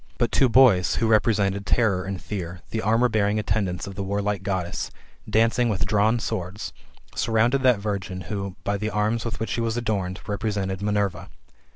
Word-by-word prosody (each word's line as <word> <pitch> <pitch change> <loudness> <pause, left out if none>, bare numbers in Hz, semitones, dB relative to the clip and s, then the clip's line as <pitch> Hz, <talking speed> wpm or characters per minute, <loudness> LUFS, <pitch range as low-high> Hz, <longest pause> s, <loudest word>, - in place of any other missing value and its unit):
But 120 -3 +1
two 135 - +4
boys, 115 -8 +5
who 115 - +1
represented 105 -3 +2
Terror 100 -3 +1
and 95 -1 -4
Fear, 90 -3 -6
the 110 - -1
armour 115 +4 +3
bearing 105 -2 +1
attendants 100 -4 -1
of 100 - -7
the 100 - -5
warlike 100 0 -1
Goddess, 95 -2 -2 0.4
dancing 115 +2 +3
with 100 -2 0
drawn 105 +2 +2
swords, 95 -1 -4 0.4
surrounded 115 +4 +2
that 125 -3 +4
virgin 100 -3 -4
who, 100 +1 -5
by 100 0 0
the 105 +2 -2
arms 110 +2 0
with 115 - -4
which 110 -4 -3
she 115 - -1
was 115 0 -1
adorned, 100 -5 -2
represented 100 -2 -2
Minerva. 105 -2 -1
105 Hz, 175 wpm, -24 LUFS, 95-110 Hz, 0.4 s, boys